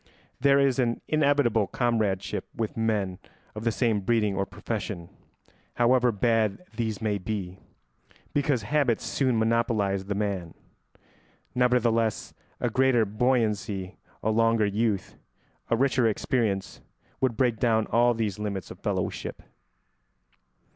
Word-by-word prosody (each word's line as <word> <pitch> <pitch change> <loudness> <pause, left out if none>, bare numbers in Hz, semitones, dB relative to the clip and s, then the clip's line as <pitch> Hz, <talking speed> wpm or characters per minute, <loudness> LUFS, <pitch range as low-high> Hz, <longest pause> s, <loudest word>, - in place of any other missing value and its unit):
There 140 +1 +4
is 135 -2 +2
an 120 -2 +1
inevitable 140 -8 +2
comradeship 110 -6 -1
with 110 -2 -3
men 105 -5 -1 0.3
of 110 +1 -7
the 115 - +3
same 115 -2 +1
breeding 105 0 +1
or 100 0 -1
profession, 95 -2 -5 0.7
however 125 0 +4
bad 110 - +1
these 110 -2 -2
may 105 -2 0
be, 95 -2 -4 0.7
because 140 -5 +1
habits 135 -1 +1
soon 130 -4 +1
monopolise 110 -4 +1
the 100 0 -3
man. 100 -5 -3 1.0
Nevertheless 120 -3 +1 0.3
a 120 - -1
greater 130 -2 +3
buoyancy, 105 -4 0 0.3
a 110 - +2
longer 115 0 +3
youth, 105 0 -1 0.5
a - - +3
richer 130 -2 +3
experience, 105 -2 -1 0.4
would 125 -4 0
break 120 -4 +1
down 110 -3 +2
all 120 +1 +4
these 110 -3 -2
limits 100 -4 -4
of - - -10
fellowship. - - -3
115 Hz, 120 wpm, -27 LUFS, 105-120 Hz, 1.0 s, There